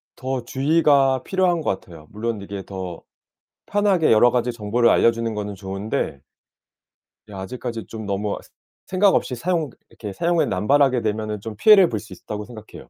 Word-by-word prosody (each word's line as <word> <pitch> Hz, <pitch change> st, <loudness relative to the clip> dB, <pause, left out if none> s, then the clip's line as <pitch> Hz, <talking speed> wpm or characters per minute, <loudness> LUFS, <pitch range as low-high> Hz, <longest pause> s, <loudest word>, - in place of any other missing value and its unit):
더 130 Hz, -1 st, -3 dB
주의가 135 Hz, -1 st, +3 dB
필요한 185 Hz, -3 st, +1 dB
것 95 Hz, -10 st, -1 dB
같아요. 80 Hz, -4 st, -14 dB
물론 110 Hz, +1 st, -3 dB
이게 100 Hz, 0 st, -6 dB
더 95 Hz, -4 st, -7 dB, 0.6 s
편하게 200 Hz, -5 st, +2 dB
여러 115 Hz, +2 st, +6 dB
가지 125 Hz, 0 st, 0 dB
정보를 115 Hz, +1 st, +1 dB
알려주는 115 Hz, -1 st, +2 dB
거는 105 Hz, -1 st, -4 dB
좋은데 95 Hz, -5 st, -3 dB, 1.1 s
이 -, -, -14 dB
아직까지 115 Hz, +4 st, -6 dB
좀 110 Hz, -1 st, -7 dB
너무 100 Hz, +1 st, -2 dB
스 -, -, -20 dB, 0.4 s
생각없이 185 Hz, -8 st, +2 dB
사용 165 Hz, +3 st, -1 dB, 0.2 s
이렇게 105 Hz, -3 st, -8 dB
사용을 170 Hz, -, +1 dB
남발하게 130 Hz, +6 st, +2 dB
되면은 110 Hz, 0 st, -2 dB
좀 110 Hz, +2 st, -7 dB
피해를 195 Hz, -, +7 dB
볼 110 Hz, -, -2 dB
수 105 Hz, 0 st, -14 dB
있다고 105 Hz, +3 st, -7 dB
생각해요. 110 Hz, -2 st, -12 dB
115 Hz, 355 characters per minute, -22 LUFS, 105-140 Hz, 1.1 s, 피해를